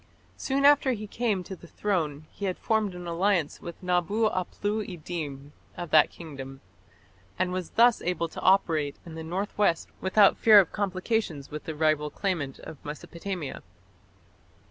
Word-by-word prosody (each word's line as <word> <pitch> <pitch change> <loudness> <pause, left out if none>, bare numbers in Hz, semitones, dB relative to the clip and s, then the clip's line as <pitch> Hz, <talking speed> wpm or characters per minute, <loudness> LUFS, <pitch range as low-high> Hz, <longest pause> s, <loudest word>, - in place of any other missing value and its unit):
Soon 275 +1 0
after 285 -2 +6
he 215 -2 -5
came 210 -3 -1
to 190 - -7
the 170 - -15
throne 160 -7 -2
he 200 - -5
had 185 -2 -1
formed 215 -4 0
an 180 0 -7
alliance 170 -2 0
with 170 +1 -9
Nabu 180 +5 +1
aplu 205 +4 -2
iddin 150 -6 -6 0.3
of 175 -2 -6
that 155 - +6
kingdom, 135 -5 -9 0.8
and 180 0 0
was 185 -2 -3
thus 235 0 +4
able 170 -1 -1
to - - -8
operate 160 -6 +3
in 165 - -9
the 160 - -6
north 185 +6 -3
west 170 -5 +2
without 195 +2 +5
fear 215 -2 +8
of 185 - +2
complications 190 - -2
with 150 0 -6
the 160 - -5
rival 155 -1 +1
claimant 160 -8 -2
of 150 - -10
Mesopotamia. 170 +2 -6
180 Hz, 160 wpm, -27 LUFS, 155-205 Hz, 0.8 s, fear